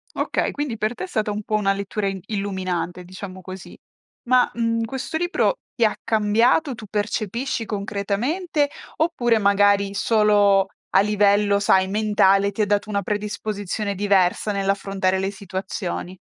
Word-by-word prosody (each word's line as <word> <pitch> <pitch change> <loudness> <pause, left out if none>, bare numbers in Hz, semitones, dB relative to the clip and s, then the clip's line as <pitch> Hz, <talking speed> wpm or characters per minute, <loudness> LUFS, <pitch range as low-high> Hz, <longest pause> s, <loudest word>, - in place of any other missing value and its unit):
Okay, - - 0
quindi 285 -6 -3
per 215 +3 -1
te 370 - -5
è - - -10
stata 215 -9 -1
un 210 +1 -3
po' 215 - -1
una 200 -2 +2
lettura 200 +1 -3
in 195 -1 -3
illuminante, 185 -4 -3
diciamo 185 0 -9
così. 185 0 -10 0.5
Ma, 250 0 +3
mhmm, 230 -1 0
questo 265 +6 -5
libro 350 +8 +1
ti 235 - +2
ha 215 - +1
cambiato, 230 +6 +2
tu 220 - -10
percepisci 220 +3 -2
concretamente, 225 - -1 0.3
oppure 250 -9 +2
magari 200 -1 +3
solo 205 -2 +3 0.3
a 190 - +6
livello, 205 0 +3
sai, 190 -1 +3
mentale, 200 -1 +3
ti 215 - -3
ha - - +3
dato 205 +1 0
una 200 -1 0
predisposizione 205 0 -3
diversa 200 0 +2
nell'affrontare 195 -1 0
le 190 +1 -1
situazioni? 190 -1 -5
205 Hz, 145 wpm, -22 LUFS, 195-220 Hz, 0.5 s, a